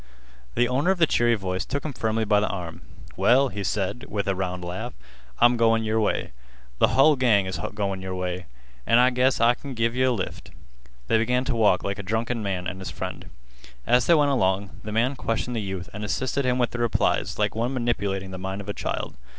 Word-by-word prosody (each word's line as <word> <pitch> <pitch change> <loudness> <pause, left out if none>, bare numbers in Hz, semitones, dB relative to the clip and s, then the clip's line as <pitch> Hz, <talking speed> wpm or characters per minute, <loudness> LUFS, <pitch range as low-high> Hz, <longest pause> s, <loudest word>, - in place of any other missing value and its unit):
The 120 - +3
owner 135 +7 +1
of 190 - +3
the 170 - +5
cheery 120 -5 +2
voice 95 -2 -3
took 140 +3 -4
him 150 - -3
firmly 110 -1 -1
by 105 -1 +4
the 105 - 0
arm. 85 -4 -6 0.3
"Well," 135 +2 +4
he 100 -3 -5
said, 100 +4 -2
with 100 -1 -3
a 100 - +2
round 90 -1 -3
laugh, 110 +8 -5 0.4
"I'm 120 0 +5
goin' 115 -1 +3
your 110 0 0
way. 105 - -1 0.5
Th' - - +6
hull 145 +3 +5
gang 115 -7 +3
is 95 - -4 0.2
goin' 100 -2 -2
your 95 0 -4
way. 90 -1 -4 0.4
An' 115 - +5
I 125 +1 +5
guess 125 +1 +2
I 120 +1 +5
kin 135 +1 -8
give 115 +1 0
yeh 130 0 +2
a - - +3
lift." 105 -6 -4 0.6
They 115 - +2
began 125 +3 +1
to 125 - -1
walk 105 -5 +3
like 100 0 -3
a - - -2
drunken 110 +4 -2
man 95 -3 -2
and 90 +2 -5
his 95 - -5
friend. - - -6 0.6
As 125 0 +3
they 170 - +6
went 145 -2 +3
along, 95 -5 +1
the 105 - -6
man 120 +6 +1
questioned 120 0 -2
the 115 - -1
youth 95 -4 -5
and 105 +1 -6
assisted 130 +6 -1
him 125 0 +2
with 120 -2 +1
the 120 - -5
replies 120 -2 +1
like 105 -1 +1
one 115 +3 -1
manipulating 100 -7 -2
the 95 - -6
mind 95 +1 -4
of 100 - -9
a - - -1
child. - - -4
110 Hz, 225 wpm, -25 LUFS, 95-125 Hz, 0.6 s, Th